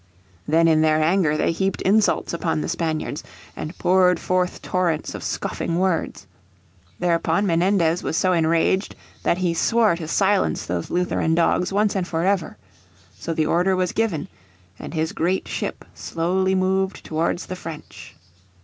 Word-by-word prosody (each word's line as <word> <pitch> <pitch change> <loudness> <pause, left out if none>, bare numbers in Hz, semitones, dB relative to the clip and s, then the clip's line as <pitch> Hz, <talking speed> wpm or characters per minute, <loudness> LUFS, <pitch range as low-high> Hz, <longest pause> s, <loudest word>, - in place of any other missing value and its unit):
Then 165 +2 +4
in 155 -1 +4
their 155 0 +3
anger 160 -2 +2
they - - +1
heaped 190 +3 -2
insults 210 -1 +2
upon 165 -2 -1
the - - -3
Spaniards, 160 -3 -2 0.3
and 155 +3 -6
poured 180 0 +3
forth 180 0 -1
torrents 175 -4 -1
of - - -7
scoffing 170 - -3
words. 185 - -1 0.7
Thereupon 170 +2 +1
Menendez 175 -1 +2
was 160 - -2
so 185 -1 +2
enraged 165 +3 +1 0.3
that 170 - +1
he 180 -2 0
swore 220 +2 +2
to 160 -2 -6
silence 195 +4 +1
those 85 -1 -3
Lutheran 175 -2 0
dogs 175 +2 +2
once 205 +1 +1
and 185 -2 -1
for 165 +1 -1
ever. 190 - 0 0.6
So - - -5
the 155 - +1
order 180 +4 +2
was 185 -1 0
given, 205 -10 -1 0.5
and - - -7
his 160 0 0
great 180 +4 -1
ship - - -4
slowly 190 +3 -1
moved 190 +1 0
towards 165 +2 -1
the 185 - -6
French. 165 -4 -10
175 Hz, 155 wpm, -22 LUFS, 160-190 Hz, 0.7 s, Then